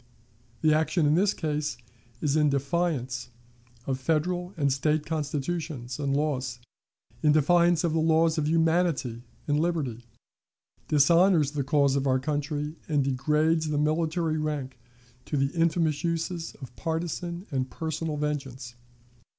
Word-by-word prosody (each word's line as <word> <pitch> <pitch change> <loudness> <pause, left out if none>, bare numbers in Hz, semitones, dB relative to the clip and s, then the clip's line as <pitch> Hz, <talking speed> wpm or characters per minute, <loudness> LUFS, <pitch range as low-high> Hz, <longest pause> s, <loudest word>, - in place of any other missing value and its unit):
The 155 -1 +4
action 160 +1 +2
in 145 - +4
this 190 +5 +3
case 150 - -2 0.4
is 145 -1 +1
in 150 -1 +4
defiance 140 -3 -1 0.6
of 130 -1 -2
Federal 175 +5 0
and 140 -3 +2
State 150 +2 0
Constitutions 150 -4 -3
and 140 -1 0
laws, 130 -5 -1 0.6
in 150 -1 +4
defiance 170 +2 +4
of 165 -2 +1
the 165 - +2
laws 160 0 +3
of 150 - 0
humanity 160 -7 +1 0.3
and 145 0 +2
liberty, 150 -9 -1 0.8
dishonors 165 +1 +4
the 145 -2 -2
cause 140 0 +2
of 140 0 0
our 130 -1 +3
country, 145 +2 -2
and 145 -3 +2
degrades 150 +4 +1
the 150 - 0
military 155 +1 0
rank 140 -5 -3 0.5
to 150 - -2
the 135 0 0
infamous 165 -2 +1
uses 165 0 -2
of 125 -1 -10
partisan 170 - -3
and 130 -2 -1
personal 160 0 -3
vengeance. 135 -4 -4
150 Hz, 135 wpm, -27 LUFS, 140-165 Hz, 0.8 s, The